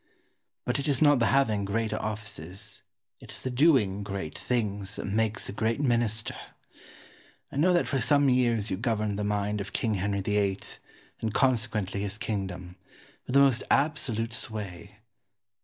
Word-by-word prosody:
But - - 0
it 140 - -2
is 140 -3 +2
not 145 -3 +5
the 115 - +3
having 110 -7 +2
great 110 +2 -1
offices, 105 -2 -5 0.4
it - - -14
is - - -5
the 130 - -2
doing 125 - +3
great 100 -6 -5
things, 105 -4 -2
that - - -5
makes 110 +2 0
a - - -4
great 110 +3 0
Minister. 120 -5 +1 1.2
I - - -6
know 170 +6 +4
that 175 - +2
for 135 -2 0
some 140 +4 +4
years 120 -4 +2
you 95 - 0
governed 110 -2 -1
the - - -1
mind 105 0 0
of 100 - -7
King 110 - 0
Henry 100 0 0
VIII., 100 -1 +1 0.6
and 110 -2 -3
consequently 110 -6 +1
his 100 +1 -3
kingdom, 95 -5 -4 0.5
with 125 - -2
the 140 - +8
most 135 -3 +4
absolute 125 -6 +1
sway. 105 -3 -6
110 Hz, 160 wpm, -28 LUFS, 100-125 Hz, 1.2 s, the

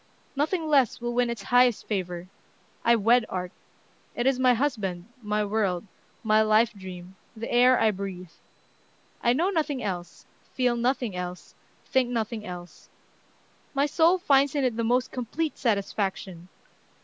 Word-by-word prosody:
Nothing 315 +4 0
less 275 -6 +3
will 240 0 -3
win 245 0 +1
its 235 -4 -5
highest 245 +1 +3
favor. 180 -4 -3 0.6
I 235 0 +5
wed 230 +3 +4
art. 180 -1 -4 0.6
It 240 - -1
is 265 -1 +2
my 255 -1 +4
husband, 210 -10 -2 0.2
my 210 -1 -1
world, 200 -3 -1 0.4
my 215 -1 +4
life 215 +1 +3
dream, 185 -2 -10 0.2
the 230 - -5
air 250 +1 +5
I 220 -1 +4
breathe. 185 -3 -7 0.9
I 240 - +3
know 345 +9 +1
nothing 300 - -1
else, 180 -4 -5 0.3
feel 250 -2 +2
nothing 240 -3 -1
else, 180 0 -6 0.3
think 260 -2 +1
nothing 230 -2 -3
else, 175 -1 -10 0.9
My 280 +1 +3
soul 330 +4 +3
finds 280 -5 +3
in 285 - +1
it 250 -3 +1
the 230 - -1
most 245 +2 +1
complete 280 +6 -3
satisfaction.... 195 -5 -2
230 Hz, 150 wpm, -26 LUFS, 195-255 Hz, 0.9 s, I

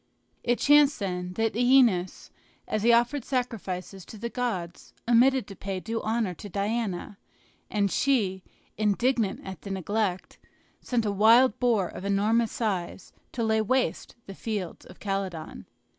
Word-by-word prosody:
It 240 0 +1
chanced, 290 0 +5
then, 180 -4 -4
that 225 +2 0
OEneus, 240 -7 +3 0.4
as 215 - -1
he 235 +3 +4
offered 240 +3 +2
sacrifices 200 -8 -4
to 220 - -11
the 235 +3 -5
gods, 205 -9 -4
omitted 250 +2 +4
to 195 - -10
pay 195 -1 -4
due 225 +4 -4
honors 220 -6 -1
to 205 - -9
Diana; 200 -1 -3 0.5
and 200 -2 0
she, 210 -9 +1 0.4
indignant 215 0 +1
at 190 -4 -8
the 200 - -8
neglect, 195 0 -2 0.4
sent 235 -3 -1
a 205 - +1
wild 225 +4 +5
boar 230 -7 +2
of - - -9
enormous 210 +3 +1
size 190 -5 -3 0.2
to 235 - -2
lay 220 0 +2
waste 255 +5 -1
the 195 - -8
fields 200 -4 -5
of - - -15
Calydon. 195 -5 -4
215 Hz, 145 wpm, -27 LUFS, 195-235 Hz, 0.5 s, chanced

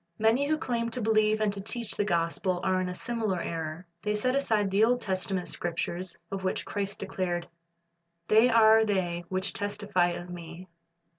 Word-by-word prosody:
Many 230 +6 +3
who 310 +1 +2
claim 235 -6 -1
to 235 - -3
believe 215 -1 +3
and 210 -2 +2
to 200 - -4
teach 230 +2 -3
the - - +1
gospel 175 0 0
are 185 -1 +2
in 180 - -2
a 180 - -5
similar 225 -4 -2
error. 165 +1 -4 0.2
They 210 0 -1
set 255 +5 +1
aside 215 -8 +1
the 200 +3 +4
Old 245 +2 +3
Testament 190 -2 -2
Scriptures, 175 +1 -3
of 195 -1 -4
which 185 - -1
Christ 200 -1 -3
declared, 180 -3 -3 0.8
"They 220 +3 +6
are 220 -1 +6
they 180 -5 -1
which 185 +1 0
testify 205 -3 0
of 175 +1 -7
Me." 170 +1 -9
200 Hz, 175 wpm, -28 LUFS, 180-220 Hz, 0.8 s, They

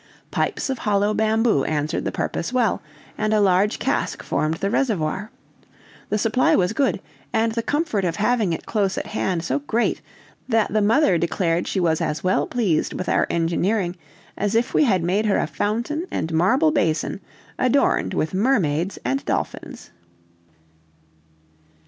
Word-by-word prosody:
Pipes - - -1
of 260 - -4
hollow 205 0 +1
bamboo 220 - +2
answered 150 +1 -2
the - - -1
purpose 170 - -3
well, 245 -5 +1 0.4
and 215 0 +1
a - - +3
large 195 +1 +3
cask - - -2
formed 155 +1 0
the 195 +4 -2
reservoir. 210 - -1 0.8
The 210 - +1
supply 225 +4 +2
was 180 +3 +1
good, 260 -4 +1 0.3
and 225 +1 +1
the 230 +1 -1
comfort 290 - -1
of 170 -2 0
having 215 -2 +1
it 165 - -4
close 200 -3 0
at - - -2
hand 185 -5 -2
so 140 -4 -1
great, 220 +12 -1 0.5
that 225 -3 +1
the 215 - +3
mother 210 - +3
declared 170 0 0
she 195 - -1
was 165 -3 +1
as 150 - -2
well 185 0 +1
pleased 210 -10 0
with 185 - -4
our - - +2
engineering 175 +3 0 0.4
as 205 +2 -1
if 235 +2 +1
we 305 - +4
had 190 -8 +2
made 200 +5 +1
her 200 - +2
a - - +1
fountain 235 - -2
and 160 - -3
marble 160 -1 +3
basin 165 +4 0 0.4
adorned 255 +2 +2
with 155 - -1
mermaids 190 - +1
and 135 +3 -1
dolphins. - - -4
200 Hz, 160 wpm, -22 LUFS, 170-225 Hz, 0.8 s, we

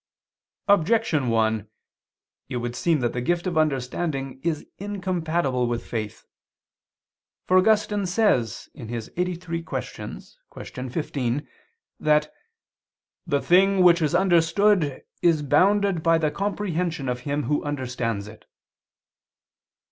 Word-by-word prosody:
Objection 195 - +3
1: 110 -2 +1 0.8
It 130 - -3
would 120 0 -4
seem 160 +2 +1
that 120 - 0
the 125 - -2
gift 175 +7 0
of 180 -2 -2
understanding 135 -2 -1
is 160 -3 -1
incompatible 175 -10 -1
with 120 0 -3
faith. 110 -3 -5 1.2
For 185 0 +5
Augustine 210 -1 +2
says 175 - +1
(QQ. 115 -4 -6
lxxxiii, 180 - -6
qu. 130 -1 -5
15) 140 -2 -2 0.5
that 150 0 +2 0.9
"the 140 -4 +1
thing 190 +1 +4
which 175 -1 +6
is 150 -2 +1
understood 175 -2 +3 0.2
is 165 -4 +3
bounded 190 +5 +3
by 165 0 +4
the 155 -2 0
comprehension 180 -5 -2
of 125 0 -1
him 145 +3 -2
who 150 - 0
understands 125 -7 -3
it." 110 +1 -13
155 Hz, 110 wpm, -24 LUFS, 130-180 Hz, 1.2 s, which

